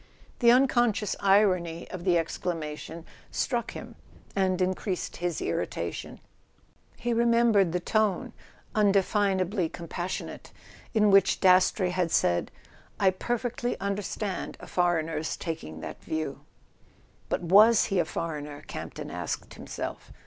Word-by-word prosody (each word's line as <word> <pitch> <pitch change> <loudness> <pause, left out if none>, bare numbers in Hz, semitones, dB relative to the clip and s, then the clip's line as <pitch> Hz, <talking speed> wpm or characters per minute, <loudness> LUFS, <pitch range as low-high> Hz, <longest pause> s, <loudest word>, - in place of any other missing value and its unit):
The 235 - +5
unconscious 240 -4 +3
irony 185 -4 +2
of 180 -1 -6
the 180 -2 +4
exclamation 165 -1 -4 0.2
struck 240 -3 -1
him, - - -8 0.4
and 190 -2 +1
increased 185 0 -2
his 175 -1 -2
irritation. - - -3 0.8
He 240 0 -1
remembered 230 -5 +4
the 180 +1 -1
tone—undefinably 200 -2 0
compassionate—in 185 +5 -3
which 195 -1 +5
Dastrey 185 0 +4
had 180 -2 0
said: 85 - +2 0.5
"I 190 -2 +5
perfectly 240 +4 -2
understand 200 0 -3
a - - -10
foreigner's 165 -3 0
taking 80 - -6
that - - -8
view"... 155 -3 -3 0.9
But - - -1
was 210 +6 +6
he 190 - +3
a 170 - +2
foreigner, 150 -3 -5
Camp - - -7
ton - - -6
asked - - -4
himself? - - -7
185 Hz, 115 wpm, -28 LUFS, 170-210 Hz, 0.9 s, was